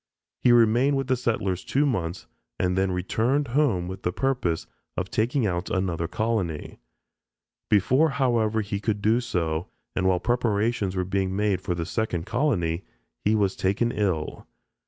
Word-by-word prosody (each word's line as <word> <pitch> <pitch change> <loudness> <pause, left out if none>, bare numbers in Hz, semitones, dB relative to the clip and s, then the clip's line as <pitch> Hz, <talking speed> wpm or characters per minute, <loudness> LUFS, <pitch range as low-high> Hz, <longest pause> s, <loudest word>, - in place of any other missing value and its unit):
He 125 - +4
remained 120 +4 +4
with 135 - -1
the 130 0 +2
settlers 100 -7 -1
two 140 +2 +1
months 90 - -2 0.3
and 90 0 +1
then 95 0 +1
returned 115 +9 0
home 120 -10 +2
with 95 +1 -6
the 90 - 0
purpose 125 -8 -1 0.3
of 90 0 -2
taking 120 +2 +1
out 90 -3 -1
another 85 -3 -1
colony. 95 -5 -2 0.9
Before, 130 - +4
however, 120 -6 +1
he 100 -1 -3
could 105 -1 -2
do 115 +3 +3
so, 85 -7 -1 0.3
and 95 - +1
while 90 -1 +3
preparations 110 -3 0
were 90 -1 0
being 95 0 -1
made 105 -2 +1
for 90 - -2
the 85 -1 -3
second 90 -3 -2
colony, 100 - 0 0.4
he 105 +2 +3
was 100 -3 +1
taken 100 +5 +1
ill. 95 -9 -2
105 Hz, 155 wpm, -25 LUFS, 90-120 Hz, 0.9 s, He